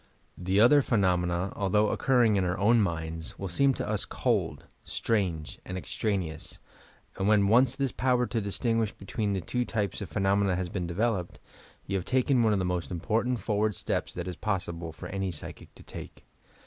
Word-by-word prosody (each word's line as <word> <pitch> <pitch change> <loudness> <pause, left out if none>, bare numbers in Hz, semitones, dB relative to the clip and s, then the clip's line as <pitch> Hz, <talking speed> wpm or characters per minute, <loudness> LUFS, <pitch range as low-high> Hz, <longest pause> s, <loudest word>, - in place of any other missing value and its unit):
The 95 +3 0
other 145 +6 +7
phenomena, 90 -5 +1
although 105 +2 +2
oc - - -2
curring 120 -5 +5
in 95 - +2
our 90 +1 -1
own 110 +4 +4
minds, 80 -3 -3
will 95 - -4
seem 135 +10 +2
to - - -4
us 105 -1 -1
cold, - - -1 0.2
strange 90 -9 -2
and 95 - -5
extraneous, 90 -5 -3 0.6
and 95 - 0
when 105 -2 +4
once 120 +4 +4
this 135 -2 -1
power 125 -1 +1
to 115 -2 -2
distinguish 110 +2 0
between 100 +1 -3
the 95 - -1
two 125 +8 -1
types 105 -4 -2
of 100 - -5
phenomena 95 +2 +2
has 90 -1 -2
been 90 -2 -3
developed, 95 0 -1 0.5
you 100 - -1
have 90 - -4
taken 130 0 +2
one 110 -2 +4
of 105 - +2
the 95 - 0
most 90 -1 -2
important 110 +8 0
forward 105 -1 0
steps - - -2
that 90 0 -4
is 90 - -4
possible 85 -4 -3
for 80 - -10
any 95 0 -2
psychic 80 -4 -9
to - - -14
take. - - -10
100 Hz, 185 wpm, -28 LUFS, 90-115 Hz, 0.6 s, other